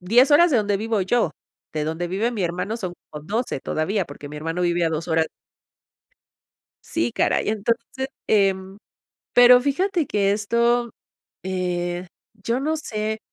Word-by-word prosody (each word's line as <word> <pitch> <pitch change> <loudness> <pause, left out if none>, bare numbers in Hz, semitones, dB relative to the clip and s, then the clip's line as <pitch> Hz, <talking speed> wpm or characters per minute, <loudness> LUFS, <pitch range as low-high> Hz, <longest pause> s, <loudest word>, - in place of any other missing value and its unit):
10 240 +10 +4
horas 340 +4 +6
de 260 - +3
donde 205 -2 +1
vivo 220 0 -1
yo, 190 -2 +1 0.4
de 155 -1 -2
donde 160 +3 -2
vive 205 +7 0
mi 215 -6 -3
hermano, 180 +6 -2
son 185 -6 -5 0.2
como 150 -1 -9
12 220 - -2
todavía, 185 +5 -1
porque 145 0 -10
mi 150 - -8
hermano 165 +4 -3
vive 175 0 +1
a - - +2
2 160 +2 -3
horas. 160 -1 +2 1.5
Sí, 115 +1 -2
caray. - - +1
Entonces, 235 +5 -2 0.2
em, 195 -1 +1 0.6
pero 245 0 +8
fíjate 335 +5 0
que 200 -3 +1
esto, 235 +3 +1 0.5
eh, 180 -1 -2 0.3
yo 230 +4 -2
no 310 +3 -1
sé, 220 -5 -3
200 Hz, 155 wpm, -23 LUFS, 175-235 Hz, 1.5 s, pero